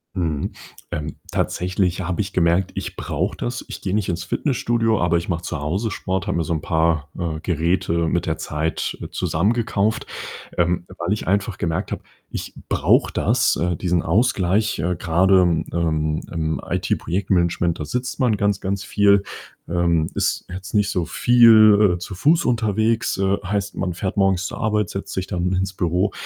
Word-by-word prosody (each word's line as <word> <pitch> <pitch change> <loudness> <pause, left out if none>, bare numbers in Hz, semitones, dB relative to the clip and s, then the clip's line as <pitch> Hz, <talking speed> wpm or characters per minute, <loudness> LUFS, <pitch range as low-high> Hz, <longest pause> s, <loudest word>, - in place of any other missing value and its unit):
Mhm. 80 -6 -1 0.4
Ähm, 75 -1 -4 0.2
tatsächlich 90 0 0
habe 90 +3 -1
ich 100 - -5
gemerkt, 85 +2 +2
ich - - -5
brauche - - -2
das. - - -4
Ich - - -8
gehe 95 - -1
nicht 105 -3 0
ins 85 0 -2
Fitnessstudio, 115 - 0
aber 85 -1 +3
ich 85 - -4
mache 85 -2 -1
zu 80 -3 -4
Hause 95 +10 -1
Sport, 95 0 -3
habe - - 0
mir 85 - +1
so 80 - -2
'n 80 - -2
paar, 80 -3 +1
äh, 80 -3 -3
Geräte 85 0 0
mit - - 0
der - - 0
Zeit, 80 +1 -2
äh, - - -5
zusammengekauft, 110 +3 0 0.5
ähm, 85 0 +1
weil 85 +4 0
ich 105 - -4
einfach 100 +1 0
gemerkt 80 -1 -2
habe, - - -4 0.3
ich - - -6 0.2
brauche - - +3
das, - - +2
äh, 85 +3 0
diesen 90 -1 0
Ausgleich. 105 +1 +2
Äh, 90 +3 0
grade, 95 +3 +4 0.3
ähm, 80 -2 0
im 80 -2 -2
IT-Projektmanagement, 85 -1 0
da 75 - -3
sitzt 125 - -3
man 120 -6 +2
ganz, 100 -1 +1
ganz 95 0 -2
viel, 100 -1 +3 0.4
ähm, 85 -2 +1
ist - - 0
jetzt 90 +1 -8
nicht 105 -2 +2
so 90 -4 -1
viel, 110 -5 +6
äh, - - -5
zu 90 +2 -7
Fuß 155 - +3
unterwegs, 110 -1 +1
äh, 95 +1 +1
heißt 100 +1 -2
man 90 -2 -2
fährt 95 +3 -4
morgens 95 -2 +2
zur - - -7
Arbeit, 105 -3 0
setzt 100 0 -5
sich 95 - -2
dann 90 -1 -1
ins 95 0 -1
Büro 90 +3 0
90 Hz, 175 wpm, -22 LUFS, 85-100 Hz, 0.5 s, viel